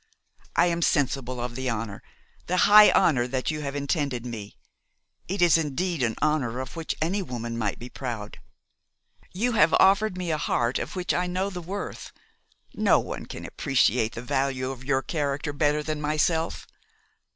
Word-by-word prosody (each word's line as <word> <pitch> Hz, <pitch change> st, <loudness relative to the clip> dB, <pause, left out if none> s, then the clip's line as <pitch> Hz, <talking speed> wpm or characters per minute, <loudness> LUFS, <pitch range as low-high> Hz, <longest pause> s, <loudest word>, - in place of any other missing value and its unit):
I -, -, +5 dB
am 170 Hz, -1 st, 0 dB
sensible 135 Hz, -5 st, 0 dB
of 120 Hz, 0 st, -4 dB
the 130 Hz, 0 st, -2 dB
honour, 110 Hz, -3 st, -4 dB, 0.5 s
the 180 Hz, -, 0 dB
high 210 Hz, +1 st, +9 dB
honour 125 Hz, -6 st, +3 dB
that 130 Hz, +3 st, -1 dB
you 155 Hz, -1 st, -4 dB
have 140 Hz, -1 st, -4 dB
intended 140 Hz, -4 st, -1 dB
me. 110 Hz, -4 st, -7 dB, 0.7 s
It 190 Hz, 0 st, 0 dB
is 165 Hz, -1 st, +5 dB
indeed 165 Hz, +2 st, -2 dB
an 115 Hz, -3 st, 0 dB
honour 135 Hz, -6 st, 0 dB
of 130 Hz, 0 st, -6 dB
which 165 Hz, -1 st, -3 dB
any 190 Hz, +5 st, 0 dB
woman 120 Hz, -8 st, -5 dB
might 110 Hz, -3 st, -2 dB
be 120 Hz, -, -8 dB
proud. 120 Hz, -5 st, -6 dB, 0.9 s
You 235 Hz, +7 st, 0 dB
have 165 Hz, -8 st, +4 dB
offered 195 Hz, 0 st, +4 dB
me 180 Hz, -2 st, -2 dB
a 155 Hz, -, -1 dB
heart 120 Hz, -3 st, 0 dB
of -, -, -5 dB
which 180 Hz, -1 st, -1 dB
I 180 Hz, +1 st, 0 dB
know 185 Hz, +2 st, -2 dB
the 180 Hz, -1 st, -6 dB
worth. 195 Hz, +4 st, -6 dB, 0.6 s
No -, -, +4 dB
one -, -, -6 dB
can -, -, -8 dB
appreciate 125 Hz, -5 st, +1 dB
the 115 Hz, -, -6 dB
value 130 Hz, 0 st, -1 dB
of 130 Hz, -1 st, -9 dB
your 135 Hz, 0 st, 0 dB
character 145 Hz, 0 st, -2 dB
better 150 Hz, +1 st, +1 dB
than 155 Hz, -1 st, -3 dB
myself. 155 Hz, +2 st, 0 dB
145 Hz, 175 wpm, -26 LUFS, 125-170 Hz, 0.9 s, high